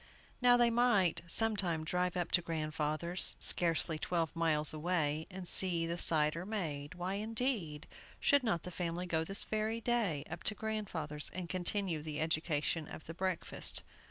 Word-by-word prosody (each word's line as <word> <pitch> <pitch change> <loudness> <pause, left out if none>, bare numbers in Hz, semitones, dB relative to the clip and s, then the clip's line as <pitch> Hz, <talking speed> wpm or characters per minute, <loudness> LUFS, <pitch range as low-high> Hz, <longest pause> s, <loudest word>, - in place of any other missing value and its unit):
Now, 245 0 +5
they 240 -1 +3
might 230 -9 +2
some 225 +5 +7
time 170 -5 -2
drive 180 +2 -2
up 175 -1 -3
to 175 - +3
grandfather's, 160 +1 +2
scarcely 165 -2 +1
twelve 165 -2 -2
miles 155 -2 +2
away, 155 -1 -2
and 185 -2 -4
see 175 -3 +5
the 170 +1 -4
cider 155 +1 +3
made. 165 -7 -5
Why, 180 +1 -4
indeed, 215 - -2 0.3
should 285 -1 +3
not 185 -9 -1
the 180 - -8
family 175 0 -4
go 160 -2 -1
this 195 +4 -3
very 220 +1 -2
day 220 -12 -1
up - - -8
to 215 - 0
grandfather's, 185 -9 -4
and 185 -2 -5
continue 185 -2 -1
the 155 0 -6
education 160 0 -1
of - - -11
the 165 - -8
breakfast? 185 0 -3
175 Hz, 160 wpm, -33 LUFS, 155-195 Hz, 0.3 s, some